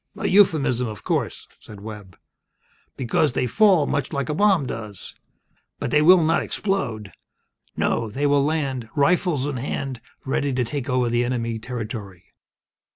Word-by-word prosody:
"A - - -4
euphemism, 150 - +3
of 105 -3 -8
course," - - -2
said 105 - -12
Webb. 105 -3 -10 0.8
"Because 130 +2 +1
they 130 - 0
will - - 0
fall 190 - +4
much 145 -2 -2
like 140 -2 -2
a - - 0
bomb 190 -3 +3
does. 110 -5 -7 0.6
But 120 - -4
they 150 - +4
will 175 +2 +7
not 160 +1 +2
explode! 120 - -2 0.7
No, 115 -2 0
they 135 +7 -2
will 145 -1 +3
land, 135 -6 -2
rifles 150 -1 +2
in 145 -2 -3
hand, 130 -1 -4 0.2
ready 140 +1 0
to 125 0 +1
take 140 +2 -4
over 125 -1 +1
the 120 +1 +1
enemy 115 -2 -2
territory." 110 -6 -7
130 Hz, 155 wpm, -23 LUFS, 115-150 Hz, 0.8 s, will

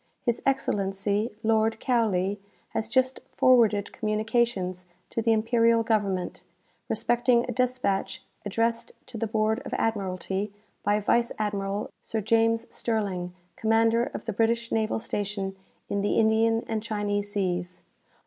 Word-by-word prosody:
"His 240 -2 0
Excellency 205 -4 0
Lord 220 0 +2
Cowley 205 -5 +1 0.3
has 220 0 -3
just 260 +2 +2 0.2
forwarded 225 -5 +4
communications 215 -4 0 0.2
to 230 - -1
the 225 0 +2
imperial 230 +1 +3
government, 200 -5 -1 0.5
respecting 240 0 +2
a 250 - -3
despatch 245 -6 -1 0.2
addressed 230 +3 -1
to 245 -3 -7
the 225 - 0
Board 220 +1 +1
of - - -4
Admiralty, 195 -2 -1 0.3
by 205 +1 +2
Vice 235 +3 +2
Admiral 205 -1 -2
Sir 225 - -3
James 225 +2 +2
Sterling, 190 -6 -2 0.2
commander 225 +1 +3
of - - -7
the 225 - -2
British 230 +2 +1
naval 220 -1 +1
station 200 -3 -3 0.3
in 200 - -1
the 205 - +1
Indian 225 +1 +3
and 220 -1 -1
Chinese 205 -2 -2
seas. 180 -2 -2
220 Hz, 130 wpm, -27 LUFS, 200-230 Hz, 0.5 s, forwarded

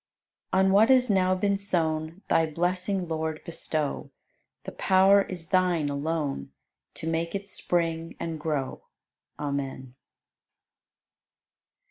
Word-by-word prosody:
86. - - +2
On 190 - +3
what 215 +4 +6
has 255 -2 +5
now 185 -1 +3
been 200 +1 0
sown 165 -2 -1
Thy 165 - +3
blessing, 180 +3 -1
Lord, 160 -1 -2
bestow; 155 -4 -3 0.5
The - - -6
power 195 +1 +5
is 175 -3 -5
Thine 180 -5 +2
alone 145 - -2 0.4
To 160 - -6
make 165 +1 -1
it 200 0 -4
spring 165 -3 -1
and 165 -2 -4
grow. 150 -4 -2 0.6
Amen. 135 -3 -4
165 Hz, 115 wpm, -27 LUFS, 155-185 Hz, 0.6 s, what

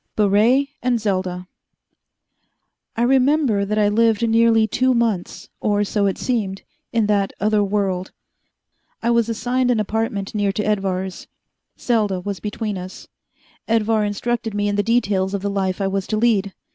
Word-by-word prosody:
Baret 220 +7 +3
and 245 -2 +1
Selda 185 -3 -2 1.5
I 235 - 0
remember 260 -4 +3
that 210 +2 -2
I 210 -1 +3
lived 225 +1 +2
nearly 225 0 +4
two 255 +3 +1
months 225 -6 -1
or 205 -1 +1
so 205 0 0
it 195 - -1
seemed 205 -6 -2 0.3
in 225 -2 +1
that 205 -2 +1
other 210 0 +2
world. 195 -2 -1 0.9
I 235 - +2
was 235 -1 +2
assigned 250 +3 0
an 240 -3 +2
apartment 210 -2 -2
near 205 -2 +1
to 210 - -2
Edvar's 190 -3 -2 0.5
Selda 210 -6 0
was 200 +1 -5
between 210 -1 -4
us. 185 +1 -9 0.6
Edvar 225 -1 +2
instructed 225 +2 -2
me 205 0 0
in 205 - 0
the 205 - +2
details 200 -4 +1
of 200 - -4
the 200 - -1
life 190 -1 -1
I 195 - 0
was 195 0 -2
to 215 - -1
lead. 210 -4 +1
210 Hz, 160 wpm, -21 LUFS, 195-230 Hz, 1.5 s, nearly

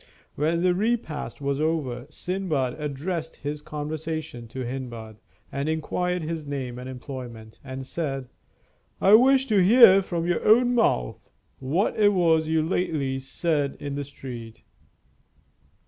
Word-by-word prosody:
When 165 +4 0
the 180 -1 +4
repast 190 - -2
was 140 +1 -1
over, 150 -6 -1
Sindbad 155 -8 -2
addressed 155 +3 -4
his 145 +1 -5
conversation 150 -4 -5
to 130 +2 -5
Hindbad, 120 -4 -6 0.3
and 140 +2 -2
inquired 180 +3 -1
his 160 0 -4
name 130 -4 -5
and 125 +1 -7
employment, 125 -4 -8
and 130 0 -6
said: 135 -3 -3 0.7
"I 195 - +5
wish 265 +4 +6
to 210 -7 +3
hear 195 -1 +8
from 170 -3 -3
your 175 -1 0
own 245 +3 +5
mouth 60 - 0 0.3
what 160 +12 0
it 205 -1 +5
was 165 -4 +3
you 160 0 +2
lately 155 -6 -1
said 145 +1 -1
in 140 -1 -5
the 145 0 -3
street." 125 -5 -9
150 Hz, 135 wpm, -25 LUFS, 130-180 Hz, 0.7 s, hear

